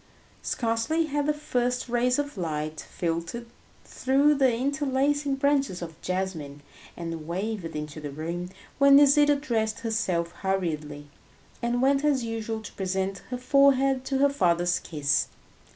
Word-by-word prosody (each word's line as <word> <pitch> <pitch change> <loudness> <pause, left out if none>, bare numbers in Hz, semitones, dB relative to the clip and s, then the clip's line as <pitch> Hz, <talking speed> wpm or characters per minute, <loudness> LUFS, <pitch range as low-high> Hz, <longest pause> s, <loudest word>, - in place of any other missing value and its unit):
Scarcely 235 +8 0
had 290 -1 -1
the - - +4
first 250 -5 -1
rays 245 +1 +1
of 290 0 -3
light 155 -4 -3
filtered 170 +7 -3 0.4
through 275 +3 +2
the 270 -3 +3
interlacing 280 +2 0
branches 275 -9 +1
of 165 -2 -9
jasmine 170 -7 -4 0.3
and 165 -2 -5
wavered 190 -1 -3
into 150 0 -5
the 145 - -5
room, 170 +5 -5 0.3
when 280 0 +7
Nisida 290 +1 +6
dressed 225 -7 -1
herself 185 -7 -1
hurriedly, 155 -7 -2 0.6
and 240 +1 0
went 275 +1 +3
as 280 -4 +2
usual 225 -1 -3
to - - -9
present 190 0 -2
her 250 - -3
forehead 270 0 +3
to 270 - -1
her 280 +1 +4
father's 175 -7 +2
kiss. 145 -3 0
230 Hz, 135 wpm, -26 LUFS, 170-275 Hz, 0.6 s, when